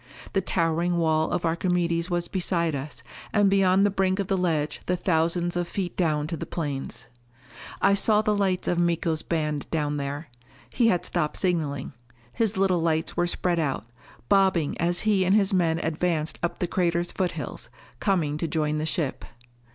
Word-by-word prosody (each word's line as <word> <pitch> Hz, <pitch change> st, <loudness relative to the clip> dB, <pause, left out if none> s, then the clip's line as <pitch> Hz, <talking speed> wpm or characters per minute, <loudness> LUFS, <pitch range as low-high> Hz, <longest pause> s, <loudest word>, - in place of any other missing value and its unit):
The 195 Hz, -, +2 dB
towering 170 Hz, -1 st, 0 dB
wall 160 Hz, -1 st, +2 dB
of 175 Hz, -, -1 dB
Archimedes 170 Hz, 0 st, 0 dB
was 175 Hz, -1 st, -1 dB
beside 170 Hz, -3 st, 0 dB
us; 135 Hz, -3 st, -6 dB, 0.3 s
and 205 Hz, -2 st, +3 dB
beyond 195 Hz, 0 st, +4 dB
the 205 Hz, -, +2 dB
brink 190 Hz, -1 st, +1 dB
of 200 Hz, -, -1 dB
the 195 Hz, -, 0 dB
ledge 160 Hz, -5 st, -1 dB
the 180 Hz, -, +1 dB
thousands 170 Hz, 0 st, +1 dB
of 175 Hz, -1 st, -1 dB
feet 185 Hz, 0 st, -4 dB
down 155 Hz, -4 st, +1 dB
to 165 Hz, +2 st, -3 dB
the -, -, -6 dB
plains. 145 Hz, -5 st, -4 dB, 0.8 s
I 200 Hz, -, +5 dB
saw 210 Hz, +2 st, +3 dB
the 215 Hz, -1 st, +2 dB
lights 190 Hz, -3 st, 0 dB
of 175 Hz, -, +1 dB
Miko's 170 Hz, -2 st, +1 dB
band 150 Hz, -3 st, -2 dB
down 150 Hz, -2 st, -1 dB
there. 145 Hz, +2 st, -4 dB, 0.4 s
He 240 Hz, -2 st, +2 dB
had 180 Hz, -6 st, +2 dB
stopped 155 Hz, -4 st, -1 dB
signaling. 155 Hz, -7 st, -1 dB, 0.4 s
His 220 Hz, -3 st, 0 dB
little 190 Hz, -3 st, +2 dB
lights 160 Hz, -1 st, 0 dB
were 175 Hz, -, +1 dB
spread 175 Hz, 0 st, 0 dB
out, 135 Hz, -9 st, -1 dB, 0.4 s
bobbing 190 Hz, -6 st, +3 dB
as 175 Hz, +1 st, +2 dB
he 210 Hz, -3 st, +2 dB
and 185 Hz, +2 st, +3 dB
his 200 Hz, -2 st, +3 dB
men 165 Hz, -3 st, +2 dB
advanced 160 Hz, -1 st, -1 dB
up 175 Hz, -, -2 dB
the -, -, -1 dB
crater's 175 Hz, -1 st, 0 dB
foothills, 185 Hz, -2 st, -3 dB, 0.3 s
coming 160 Hz, -7 st, 0 dB
to 165 Hz, -, -1 dB
join 155 Hz, -1 st, 0 dB
the 155 Hz, -, -2 dB
ship. 150 Hz, -1 st, -2 dB
170 Hz, 175 wpm, -26 LUFS, 155-185 Hz, 0.8 s, I